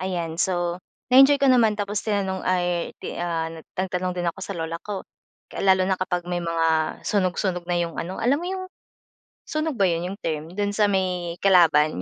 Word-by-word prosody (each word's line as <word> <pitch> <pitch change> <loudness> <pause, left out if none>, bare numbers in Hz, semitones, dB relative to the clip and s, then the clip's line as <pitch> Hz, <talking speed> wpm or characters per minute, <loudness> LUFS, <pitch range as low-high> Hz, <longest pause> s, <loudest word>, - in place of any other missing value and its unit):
ayan. 175 -3 -3
So, 175 -1 0 0.3
na-enjoy 270 +2 +8
ko 275 - +4
naman 225 -4 +4
tapos 205 0 -2
tinanong 195 -3 -1
ay 175 -2 0
ti - - -7
ah, 165 -2 -2 0.2
nagtanong 185 -1 -2
din 175 -1 -2
ako - - -19
sa 195 -1 -5
lola 165 0 -4
ko. 205 -2 -6 0.5
Lalo 190 -1 +3
na 190 - +2
kapag 180 -1 -1
may 175 0 -2
mga 165 -1 0
sunog 185 -3 +1
sunog 180 -3 -1
na 175 - +1
'yung 170 -1 -2
ano 180 +3 -5
alam 270 +6 +2
mo 350 - -4
'yung 375 0 -4 0.8
Sunog 310 -3 -2
ba 195 - +4
'yun 170 -1 +1
'yung 195 - -6
term, 160 +3 -4
dun 205 0 0
sa 210 -1 +3
may 180 -3 -1
kalaban? 160 - +4
185 Hz, 190 wpm, -24 LUFS, 170-200 Hz, 0.8 s, na-enjoy